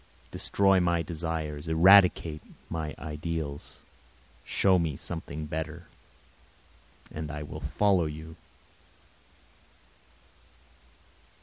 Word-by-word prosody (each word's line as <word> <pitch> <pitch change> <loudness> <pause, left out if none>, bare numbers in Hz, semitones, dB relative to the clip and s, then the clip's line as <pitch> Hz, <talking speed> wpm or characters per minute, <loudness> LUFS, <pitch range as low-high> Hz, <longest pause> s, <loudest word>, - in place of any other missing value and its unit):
Destroy 95 -1 +2
my 85 -2 +1
desires, 80 -2 -4
eradicate 85 -2 +5 0.3
my 80 -2 -3
ideals, 75 -1 -5 0.6
show 95 -2 +3
me 80 -5 -2
something 80 -2 -6
better, 80 +3 -5 1.3
and 75 0 -5
I 75 -1 -5
will 75 +1 -8
follow 90 +3 +2
you. 80 +1 -8
80 Hz, 80 wpm, -28 LUFS, 75-85 Hz, 1.3 s, eradicate